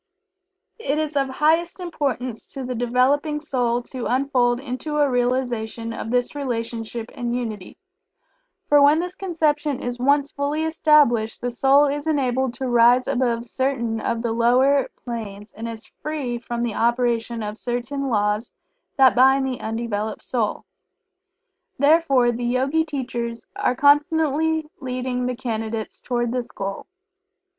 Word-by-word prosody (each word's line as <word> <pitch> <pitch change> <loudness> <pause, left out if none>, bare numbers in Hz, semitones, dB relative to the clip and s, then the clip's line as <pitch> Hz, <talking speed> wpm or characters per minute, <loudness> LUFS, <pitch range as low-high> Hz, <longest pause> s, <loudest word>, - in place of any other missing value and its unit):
It 285 -8 -1
is 310 -1 -2
of 275 -1 +2
the 265 - -7
highest 325 +5 +1
importance 270 -9 -3
to 270 - -5
the 250 0 -3
developing 255 +5 +1
soul 245 -5 0
to 250 -1 -5
unfold 250 -2 +1
into 275 +3 -4
a 295 -1 +4
realization 245 -3 -1
of 225 - -5
this 245 +1 0
relationship 230 -4 -4
and 240 0 -3
unity, 220 -6 -5 0.9
_for 290 -1 +5
when 290 +2 +6
this 355 +2 -2
conception 305 -7 0
is 245 -2 -4
once 280 +2 +2
fully 285 +2 -1
established 300 -8 +3
the 245 - -3
soul 270 +4 +4
is 290 +2 -2
enabled 260 -4 0
to 260 +1 -3
rise 240 +1 +5
above 245 -3 0
certain 235 -3 -1
of 230 0 -2
the 235 - 0
lower 255 +5 +3 0.2
planes, 210 -4 -6
and 230 +2 -6
is 225 -1 -7
free 280 -6 -4
from 235 0 -4
the 235 -2 -1
operation 235 -1 0
of 210 +1 -5
certain 255 +3 -3
laws 210 0 0 0.5
that 265 -2 +6
bind 265 +2 +5
the 260 -1 -3
undeveloped 220 -1 -3
soul_. 230 -5 -2 1.1
Therefore 280 -4 +4
the 240 +1 -4
Yogi 265 +6 +1
teachers 240 -5 -4
are 250 - 0
constantly 310 +2 +3
leading 250 -1 -2
the 250 - -2
Candidates 225 -3 -4
toward 240 -2 -1
this 245 -1 -3
goal. 195 -3 -5
250 Hz, 145 wpm, -22 LUFS, 235-285 Hz, 1.1 s, when